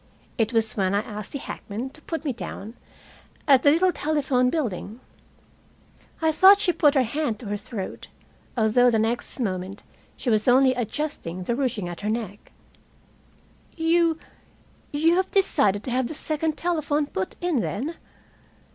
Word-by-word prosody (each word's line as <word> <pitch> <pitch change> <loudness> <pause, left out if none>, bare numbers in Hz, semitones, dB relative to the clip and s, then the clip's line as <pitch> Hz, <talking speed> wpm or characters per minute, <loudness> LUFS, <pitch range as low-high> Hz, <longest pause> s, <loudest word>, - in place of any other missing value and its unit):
It 225 -1 +2
was 225 -2 +1
when 195 -1 +1
I 205 - +2
asked 210 -1 -8
the - - -3
hackman 245 -1 -6
to 310 - -16
put 325 0 -5
me 275 - 0
down 225 -2 -7 0.7
at 270 -3 +6
the 285 - +5
little 350 +5 +4
telephone 280 -6 +1
building. 235 - -3 1.2
I 320 - +4
thought 380 +6 +7
she 370 -4 +2
put 300 -2 +3
her 265 - +4
hand 255 -1 -2
to 230 - -11
her 205 - -1
throat, 205 -1 -7 0.5
although 235 +2 +4
the 230 - +2
next 225 +4 -2
moment 190 -3 -3 0.3
she 245 - -1
was 215 +1 +1
only 260 +1 +5
adjusting 240 - -4
the 235 +6 -1
ruching 240 -8 -1
at 175 +2 -7
her 210 - -2
neck. 215 -3 -4 1.3
"You 330 0 +2 0.7
you 325 +4 +3
have 375 - +1
decided 210 - +2
to 255 - -4
have 255 0 +1
the 315 - -7
second 310 0 -2
telephone 305 -4 0
put 190 -8 -4
in, 350 -4 0
then?" 255 +7 -2
255 Hz, 160 wpm, -24 LUFS, 215-310 Hz, 1.3 s, thought